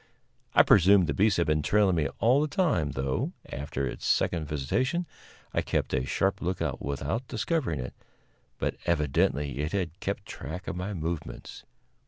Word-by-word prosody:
I - - +8
presume 95 0 +6
the - - -1
beast 105 0 +3
had 85 - +2
been 75 0 +2
trailing 100 +2 +3
me 75 -3 +1
all 125 +5 +4
the 155 - +1
time, 145 - +1
though, 65 0 -1 0.2
after 70 0 -3
its 60 - -5
second 80 -3 +1
visitation, 125 - 0 0.5
I - - +2
kept - - -1
a 65 0 0
sharp 95 +7 0
lookout 90 +1 -2
without 70 - -2
discovering 115 - -1
it, 65 - -5 0.6
but - - -2
evidently 75 -3 +1
it 75 +4 -2
had 90 -3 -2
kept 100 +1 -3
track 80 +6 -7
of - - -3
my 95 +3 -4
movements. 80 -1 -5
85 Hz, 165 wpm, -28 LUFS, 75-100 Hz, 0.6 s, I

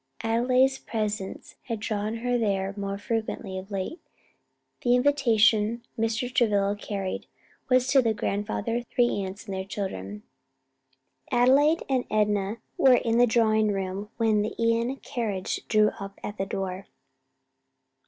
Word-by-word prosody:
Adelaide's 255 +4 +2
presence 215 -5 -4
had 230 -3 -3
drawn 215 0 -2
her 245 0 +2
there 200 -4 0
more 200 -1 -3
frequently 215 -2 -3
of 190 +2 -11
late. 200 - -4 0.8
The 245 0 +3
invitation 235 -4 +3
Mr. 225 +2 -1
Travilla 205 -4 +2
carried 195 -2 -4 0.4
was 255 -1 +4
to 270 0 +6
the 230 -2 +1
grandfather, 210 +3 -2
three 240 0 +1
aunts 190 +3 -7
and 200 - -5
all 190 - -2
their 190 - -9
children. 205 +1 -5 1.1
Adelaide 275 +6 +4
and 260 -2 0
Enna 210 0 +1 0.2
were 260 -2 +7
in 230 -1 +1
the 245 - +6
drawing 220 -2 +3
room 195 +1 -3
when 220 -2 +2
the 215 - -3
Ion 230 +3 +1
carriage 220 -8 -3
drew 215 -1 +4
up 200 0 -8
at 210 -1 -6
the 195 - -1
door. 190 0 -4
220 Hz, 140 wpm, -26 LUFS, 200-240 Hz, 1.1 s, were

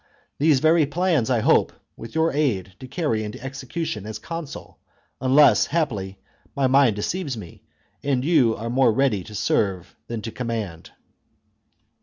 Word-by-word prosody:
These 145 -2 +4
very 160 -1 +4
plans 160 -5 +1
I 120 -3 +2
hope, - - +3 0.2
with 115 +4 -10
your 160 +1 +2
chap.xx 145 - -2
aid, 100 -10 -1
to 130 - -9
carry 125 -7 -1
into 105 0 -7
execution 135 - -5
as 110 -1 -5
consul, 165 -4 -8 0.4
unless, 135 +3 +5
haply, 105 - -2 0.4
my 140 - +1
mind 130 -4 +4
deceives 140 - -3
me, 90 -6 -11 0.4
and 135 -2 0
you 130 -9 +3
are 115 +2 -5
more 130 -1 +4
ready 115 -5 +1
to 105 - -11
serve 95 -4 -1
than 115 -2 -5
to 115 - -5
command." 110 -9 -5
130 Hz, 155 wpm, -23 LUFS, 110-150 Hz, 0.4 s, unless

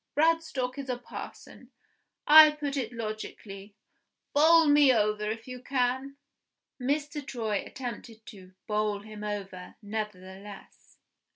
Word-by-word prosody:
Bradstock 300 -5 +1
is 275 -1 -7
a 250 - -1
parson. 245 - -11 0.6
I 310 +1 +10
put 290 -2 -4
it 250 -5 -3
logically. 215 -3 -7 0.6
Bowl 320 +3 +6
me 290 -2 +6
over, 210 -2 +1
if 225 +2 -5
you 250 -1 -8
can." 260 +1 -1 0.6
Mr. 290 +2 -2
Troy 225 -6 -3
attempted 230 -3 -8
to 185 -2 -13
"bowl 210 -1 -1
him 215 0 -10
over," 195 -3 -6
nevertheless. 205 -2 -8
230 Hz, 115 wpm, -28 LUFS, 210-275 Hz, 0.6 s, I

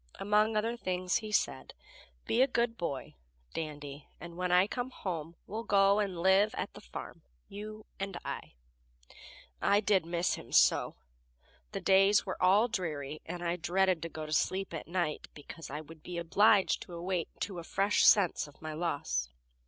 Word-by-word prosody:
Among 210 +2 +2
other 225 +3 0
things 185 -5 -1
he 215 -1 -6
said: 65 - -1 0.5
"Be 235 - +2
a 265 - +6
good 235 -2 0
boy, 140 - -4 0.4
Dandy, 145 -2 -6
and 170 0 -9
when 180 0 -1
I 180 +1 +6
come 245 +4 -4
home 170 -8 -5
we'll 220 +3 -4
go 200 -2 +4
and 195 -4 -1
live 195 +3 +4
at - - -4
the - - -11
farm - - -9 0.3
you 215 +1 -8
and 195 -2 -4
I." - - -6 1.1
I 200 - +4
did 195 -5 +2
miss 170 +1 0
him - - -8
so! - - +4 0.8
The - - -4
days 195 +1 +5
were 185 - -5
all 195 +6 +5
dreary, 155 - -4
and 175 0 -5
I 170 0 -1
dreaded 180 +1 +1
to 165 - -4
go 155 0 -6
to 155 - -5
sleep 190 +3 0
at 165 - -6
night, 170 -3 -2
because 155 +2 -10
I 150 +3 -5
would 155 +1 -14
be 180 +1 -7
obliged 185 +1 +3
to 175 - -10
awake 175 0 -2
to 185 -2 -3
a - - -7
fresh 200 +4 +2
sense 190 -7 +5
of 145 - -17
my 155 -1 -6
loss. 155 - -2
180 Hz, 175 wpm, -31 LUFS, 165-205 Hz, 1.1 s, a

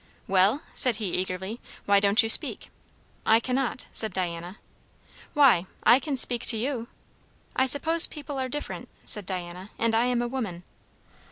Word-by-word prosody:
"Well?" 195 - +1
said 250 -4 +3
he 210 -4 -5
eagerly. 190 +4 -5 0.3
"Why 200 0 +3
don't 200 +4 +2
you - - -3
speak?" 225 - +5 0.5
"I 225 +1 +3
cannot," 255 +1 -4
said 220 -4 +2
Diana. 175 +1 -5 0.8
"Why? 250 -12 +3 0.2
I 245 - +5
can 280 -1 -5
speak 245 -1 +3
to 225 - +5
you." 235 0 -4 0.7
"I 260 - +1
suppose 320 +5 +5
people 290 -2 -9
are 260 -1 -4
different," 295 +3 -7 0.2
said 210 -5 -1
Diana. 180 +1 -7
"And 230 0 -1
I 230 +2 +1
am 245 -1 -1
a - - -4
woman." 220 -9 -6
225 Hz, 160 wpm, -24 LUFS, 190-260 Hz, 0.8 s, speak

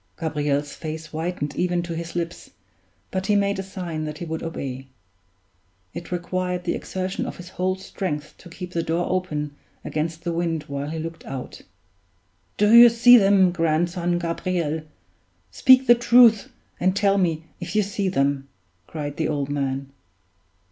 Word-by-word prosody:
Gabriel's 145 -2 -1
face 160 0 -6
whitened 160 -2 -3
even 175 -1 0
to 170 -1 -5
his 170 +1 -6
lips, 170 0 -4 0.6
but 190 0 -2
he 210 - +3
made 200 -1 +1
a - - 0
sign 180 -5 -5
that 150 0 -5
he 175 - -6
would 160 0 -4
obey. 135 -5 -5 1.1
It 170 - -8
required 180 0 -2
the - - -1
exertion 185 0 -4
of - - -7
his 180 -1 -10
whole 185 0 -1
strength 180 -5 -5
to 175 - -13
keep 180 +1 -8
the 170 - -1
door 165 +2 -1
open 150 -6 -2 0.3
against 160 +2 -3
the 170 -1 -2
wind 165 -2 -1
while 140 -1 -5
he 160 - -4
looked 165 +1 -6
out. 135 -1 -7 1.0
"Do 210 +2 +4
you 235 0 +10
see 235 +1 +7
them, 195 -4 +5
grandson 175 +1 0
Gabriel? 170 -2 -2 0.7
Speak 260 - +6
the 240 - +8
truth, 235 -2 +5 0.3
and 185 +1 +2
tell 200 0 +3
me 165 -3 0 0.2
if 175 +1 -6
you 210 - +4
see 200 -1 -2
them," 140 -4 0 0.4
cried 145 -2 -5
the 160 - 0
old 145 -2 -2
man. 135 -1 -2
170 Hz, 160 wpm, -23 LUFS, 155-185 Hz, 1.1 s, you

